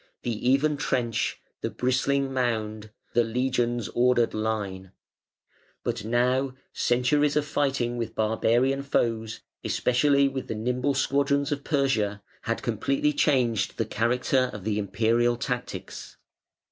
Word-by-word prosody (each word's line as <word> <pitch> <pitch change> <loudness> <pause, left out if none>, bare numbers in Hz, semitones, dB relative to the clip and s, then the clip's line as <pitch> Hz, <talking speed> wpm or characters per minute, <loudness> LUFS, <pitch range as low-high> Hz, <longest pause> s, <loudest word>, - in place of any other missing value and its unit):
The 120 +1 -1
even 145 +3 +3
trench, 120 -4 -1 0.2
the - - -1
bristling 135 +2 0
mound, 110 -4 -1 0.2
The 120 - +4
legion's 120 -1 0
ordered 120 -1 +2
line" 100 -4 -3 0.9
but - - -2
now, 125 +3 +1 0.2
centuries 140 +4 +2
of 150 -1 +2
fighting 135 -5 0
with 115 -1 -4
barbarian 120 +5 +2
foes, 115 -5 -1 0.2
especially 140 +2 +3
with 135 -1 -4
the 110 - -3
nimble 125 +5 0
squadrons 140 +1 +1
of 145 -1 -2
Persia, 110 -9 0 0.2
had - - -3
completely 145 +2 0
changed 125 -7 +1
the - - 0
character 125 +3 +1
of 105 - -8
the 105 0 -1
Imperial 115 +4 +1
tactics. 125 0 -5
125 Hz, 120 wpm, -26 LUFS, 115-135 Hz, 0.9 s, The